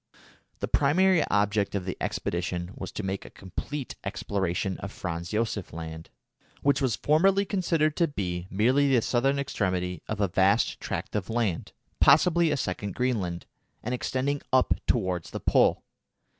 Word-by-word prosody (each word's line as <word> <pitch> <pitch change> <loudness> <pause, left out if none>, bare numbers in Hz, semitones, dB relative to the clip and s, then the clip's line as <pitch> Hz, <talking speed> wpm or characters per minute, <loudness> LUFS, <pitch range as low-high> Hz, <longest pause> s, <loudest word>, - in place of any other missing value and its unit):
The - - -1
primary 175 +4 +3
object 105 0 +1
of 95 -2 -2
the 95 - -3
expedition 85 +1 -2
was 95 - -7
to 110 - -4
make 95 0 -3
a - - -11
complete 130 +9 -6
exploration 95 -1 -2
of 100 - -6
Franz 85 -3 -5
Josef 105 -3 -2
Land, 80 0 -7 0.5
which 140 +1 +3
was 130 -5 +1
formerly 190 - +3
considered 165 -6 +1
to 170 - +3
be 90 - -4
merely 130 +8 +3
the 115 - +3
southern 135 +3 +1
extremity 90 - -1
of 105 - -3
a 100 - +3
vast 95 +2 +2
tract - - -4
of 105 -1 -2
land, 110 -7 -1 0.3
possibly 170 -2 +5
a 150 - +1
second 100 -3 -3
Greenland, 100 -9 -1 0.4
and 125 - -2
extending 130 +3 -1
up 130 -1 +4
towards 95 -7 0
the - - -5
Pole. - - +3
105 Hz, 155 wpm, -27 LUFS, 90-140 Hz, 0.5 s, possibly